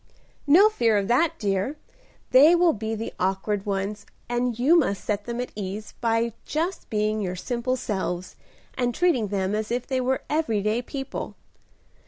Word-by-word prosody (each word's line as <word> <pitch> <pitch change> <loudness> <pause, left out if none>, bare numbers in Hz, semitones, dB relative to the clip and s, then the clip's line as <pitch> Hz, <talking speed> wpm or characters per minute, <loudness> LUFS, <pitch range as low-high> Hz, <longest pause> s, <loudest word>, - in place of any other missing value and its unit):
"No 355 +9 +7
fear 235 - +2
of 200 -1 0
that, 285 +7 +2
dear. 200 +8 -1 0.5
They 290 +7 +8
will 345 -1 +4
be 220 +1 -3
the 225 +1 -5
awkward 195 +2 -1
ones, 200 +1 -2 0.2
and 240 -1 -1
you 275 +8 +4
must 255 - +1
set 205 -1 -1
them 235 0 -4
at 250 - -3
ease 205 +1 -5
by 230 0 +1
just 335 +5 -3
being 215 0 0
your 180 -2 -2
simple 245 +6 -2
selves, 185 -6 -3 0.4
and 245 -2 -1
treating 305 -12 +2
them 195 0 -1
as 215 0 -2
if 240 +1 -1
they 260 -2 -1
were 260 +1 0
every 235 -10 0
day 215 +3 +1
people. 270 +1 -6
230 Hz, 170 wpm, -25 LUFS, 205-260 Hz, 0.5 s, They